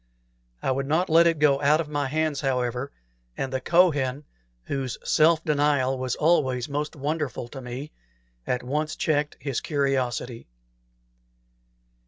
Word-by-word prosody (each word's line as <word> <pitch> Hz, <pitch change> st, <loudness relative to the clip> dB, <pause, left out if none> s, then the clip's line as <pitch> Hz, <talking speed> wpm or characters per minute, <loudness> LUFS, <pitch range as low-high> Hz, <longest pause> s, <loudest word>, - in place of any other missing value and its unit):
I -, -, +1 dB
would 135 Hz, +1 st, -1 dB
not 160 Hz, +4 st, +1 dB
let 165 Hz, +1 st, +6 dB
it 165 Hz, -1 st, +2 dB
go 145 Hz, -2 st, +3 dB
out 150 Hz, +2 st, +4 dB
of 165 Hz, -, -2 dB
my 145 Hz, -1 st, -1 dB
own -, -, -3 dB
hands, 155 Hz, -1 st, 0 dB
however; 125 Hz, -1 st, -1 dB, 0.5 s
and 135 Hz, -1 st, -3 dB
the 130 Hz, -, -1 dB
Kohen, 145 Hz, -5 st, +2 dB, 0.4 s
whose 135 Hz, -, -3 dB
self 160 Hz, +1 st, +3 dB
denial 145 Hz, -3 st, +2 dB
was 130 Hz, -1 st, -2 dB
always 135 Hz, -6 st, +2 dB
most 150 Hz, +1 st, -3 dB
wonderful 145 Hz, -4 st, -3 dB
to 135 Hz, +1 st, -8 dB
me, 125 Hz, +4 st, -7 dB, 0.6 s
at 125 Hz, -1 st, -1 dB
once 150 Hz, +4 st, -2 dB
checked 150 Hz, -1 st, 0 dB
his 135 Hz, -2 st, -3 dB
curiosity. 130 Hz, -5 st, -1 dB
140 Hz, 145 wpm, -25 LUFS, 130-155 Hz, 0.6 s, let